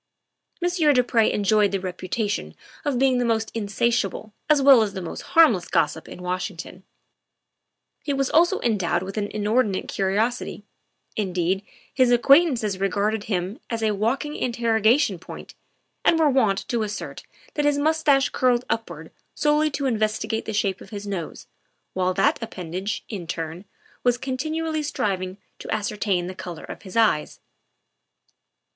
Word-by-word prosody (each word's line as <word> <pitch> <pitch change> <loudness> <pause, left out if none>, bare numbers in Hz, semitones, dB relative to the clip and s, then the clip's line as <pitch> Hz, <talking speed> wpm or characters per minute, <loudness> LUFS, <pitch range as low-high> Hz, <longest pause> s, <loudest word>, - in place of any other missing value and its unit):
Monsieur 350 -4 +3
du 250 -2 +4
Pre 230 -3 +2
enjoyed 205 0 +2
the 195 - -1
reputation 185 +3 -3 0.3
of 285 -4 0
being 260 -1 +3
the - - +1
most 225 -2 0
insatiable 220 -1 -1 0.2
as 300 -1 +5
well 270 -3 +7
as 210 -3 -1
the - - -3
most 165 - -6 0.2
harmless 230 - +6
gossip 165 -1 0
in 180 - -9
Washington; 180 0 -4 1.2
he 290 - -3
was 275 -1 +1
also 345 +7 +3
endowed 185 -6 0
with 195 +1 -7
an 205 - -1
inordinate 210 -1 0
curiosity 210 +3 -1 0.5
indeed, 185 -2 0 0.3
his 255 -2 +3
acquaintances 245 - +4
regarded 205 +2 0
him 190 +1 -2
as 230 -1 -2
a 215 - +2
walking 255 +9 -1
interrogation 230 - +2
point, - - -10 0.5
and 330 - +4
were 310 -3 +4
wont 220 -7 +1
to 235 -2 -1
assert 210 -1 -5 0.3
that 295 - 0
his 290 -1 +3
mustache 295 -2 +3
curled 250 -1 +1
upward 170 -8 -4 0.2
solely 300 +1 +2
to 280 -1 -3
investigate 220 -2 -1
the - - -3
shape 200 -2 0
of - - -12
his 205 -2 -7
nose, 190 -5 -5 0.5
while 185 0 0
that 295 -2 +2
appendage, 185 -1 -4
in 190 -7 -6
turn, 165 +3 -5 0.4
was 245 -1 +3
continually 310 +5 -2
striving 190 -10 -2 0.2
to - - -9
ascertain 205 -3 -1
the 185 - -5
color 175 -3 -8
of - - -9
his 190 +2 -7
eyes. 215 -10 +2
220 Hz, 150 wpm, -24 LUFS, 190-260 Hz, 1.2 s, well